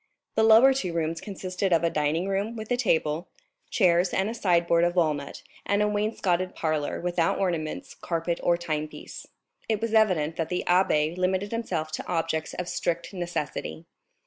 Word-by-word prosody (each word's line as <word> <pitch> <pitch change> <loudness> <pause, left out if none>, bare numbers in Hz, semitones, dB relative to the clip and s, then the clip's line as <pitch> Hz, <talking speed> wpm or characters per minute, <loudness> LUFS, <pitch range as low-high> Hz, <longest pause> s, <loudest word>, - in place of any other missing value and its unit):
The - - +2
two 220 - +5
lower 230 +5 +8 0.2
rooms 165 0 -1
consisted 190 -1 -3
of 170 -1 +3
a 170 - +2
dining 155 +4 0
room, 200 +4 -1
with 220 +1 -7
a - - +4
table, 165 -8 0 0.4
chairs, 180 -3 +3
and 205 +5 0
side 175 -6 +2
board 170 0 +3
of 175 +1 +1
walnut, 150 -5 0 0.2
and 205 +1 +1
a - - +2
wainscoted 205 -4 0
parlor, 155 -2 -1
without 175 -1 0
ornaments, 180 - -2
carpet, 170 0 -2
or 175 0 +2
timepiece. 155 -3 -5 0.4
It 220 -2 +1
was 230 0 -2
evident 180 -8 +3
that 160 -1 -2
the 180 - -1
abbé 170 -3 +3
limited 185 +2 0
himself 180 -9 -2
to 155 - -5
objects 165 -2 -1
of 180 - -4
strict 170 +2 -2
necessity. 175 -2 -4
175 Hz, 170 wpm, -26 LUFS, 165-200 Hz, 0.4 s, lower